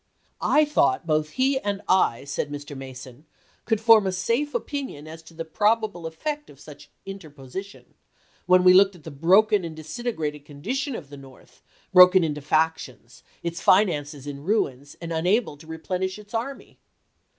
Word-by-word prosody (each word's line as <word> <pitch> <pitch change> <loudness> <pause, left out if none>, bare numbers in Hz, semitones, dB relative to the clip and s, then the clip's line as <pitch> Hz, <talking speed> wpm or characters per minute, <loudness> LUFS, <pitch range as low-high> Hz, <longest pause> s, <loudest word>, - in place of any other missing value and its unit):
" - - -35 0.2
I 305 - +6
thought 140 - +1
both 155 -1 0
he 265 +1 +2
and 205 -3 -3
I," 180 -10 +2
said 140 +1 -4
Mr. 145 0 -7
Mason, 130 +1 -10 0.2
" - - -36
could 220 -3 +1
form 220 -2 +5
a - - 0
safe 235 +10 -1
opinion 240 - -5
as 160 +1 -10
to 165 +1 -17
the 165 0 -5
probable 210 -1 0
effect 295 - -5
of 140 - -16
such 145 -1 -13 0.2
interposition, 190 0 -9 0.5
when 180 0 +5
we 180 0 +7
looked 195 +1 +5
at 165 - -17
the 160 - -8
broken 190 +8 +3
and 165 -2 -6
disintegrated 155 - -5
condi 145 - -6
tion 275 -1 -2
of 140 - -9
the 145 - -9
North, 135 -1 -17 0.3
broken 180 0 +8
into 150 -2 -2
factions, 145 -5 -2 0.2
its 170 0 -4
finances 150 -8 +2
in 140 -1 -7
ruins, 145 - -1
and 170 -1 -5
unable 180 +3 +1
to 155 +2 -16
replenish 185 +4 -4
its 210 +1 -15
army." 245 +5 -5
170 Hz, 175 wpm, -24 LUFS, 145-210 Hz, 0.5 s, broken